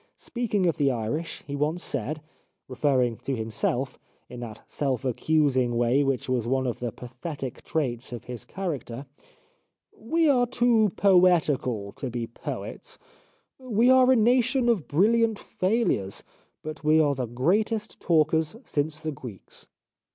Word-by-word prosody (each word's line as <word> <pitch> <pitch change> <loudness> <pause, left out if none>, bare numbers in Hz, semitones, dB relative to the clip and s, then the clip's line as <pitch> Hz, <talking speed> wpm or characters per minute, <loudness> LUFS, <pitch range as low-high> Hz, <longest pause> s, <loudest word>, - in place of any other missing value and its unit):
Speaking 215 -6 -1
of 170 - +1
the 140 -2 +3
Irish, 125 +7 -3
he 140 - -5
once 150 +4 -1
said, 145 +4 -2 0.5
referring 130 -3 +1
to 135 - -3
himself, 120 +3 -2 0.3
in 125 - -8
that 115 -3 -8
self 135 -3 -2
accusing 130 -2 +1
way 120 +4 +3
which 135 -2 -1
was 125 -3 0
one 130 +1 +1
of 125 - -2
the 120 -2 -3
pathetic 130 +3 -7
traits 130 -7 -2
of 120 - -6
his 125 -2 -7
character: 145 -9 -5 0.5
" - - -48 0.2
We 330 0 +4
are 250 -4 +4
too 235 -3 +3
poetical 160 - +3
to 130 - -6
be 120 -1 -3
poets. 115 - -7 0.6
We 245 -1 +3
are 260 0 +6
a - - +6
nation 245 +2 +3
of 210 -10 +1
bril 190 +10 +3
liant 230 -2 +2
failures, 185 - -1 0.4
but 155 0 -7
we 155 +1 +4
are 145 -2 +3
the 130 -3 -3
greatest 200 - 0
talkers 160 0 +2
since 150 - -2
the 155 0 -3
Greeks." 125 -8 -10
150 Hz, 150 wpm, -26 LUFS, 125-200 Hz, 0.6 s, are